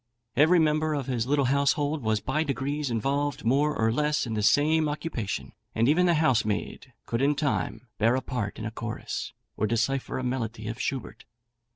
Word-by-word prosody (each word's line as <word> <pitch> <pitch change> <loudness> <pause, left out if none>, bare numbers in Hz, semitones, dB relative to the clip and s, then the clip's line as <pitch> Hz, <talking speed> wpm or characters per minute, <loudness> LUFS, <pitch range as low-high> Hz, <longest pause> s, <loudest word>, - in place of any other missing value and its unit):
Every 160 +5 +5
member 155 -1 +2
of 140 -3 -2
his 125 -3 -1
little 140 0 +2
household 145 +3 +1
was 110 -2 0
by 135 +7 0
degrees 140 +1 -2
involved 140 +4 -1
more 145 +5 +2
or 110 0 +3
less 150 +4 +1
in 115 - -4
the 105 - -1
same 150 +8 +3
occupation, 145 - -4 0.2
and 115 +2 +3
even 175 +5 +4
the 170 - +4
housemaid 130 -4 0
could 115 +2 -2
in 145 +2 +3
time 140 -3 -2
bear 115 +3 +4
a 130 - 0
part 105 -6 -3
in 110 - -5
a 110 - -3
chorus, 115 -1 -5 0.2
or 110 - 0
decipher 120 +4 -1
a 130 - -3
melody 115 -4 -3
of 115 +2 -4
Schubert. 135 -4 -4
135 Hz, 185 wpm, -27 LUFS, 115-150 Hz, 0.2 s, Every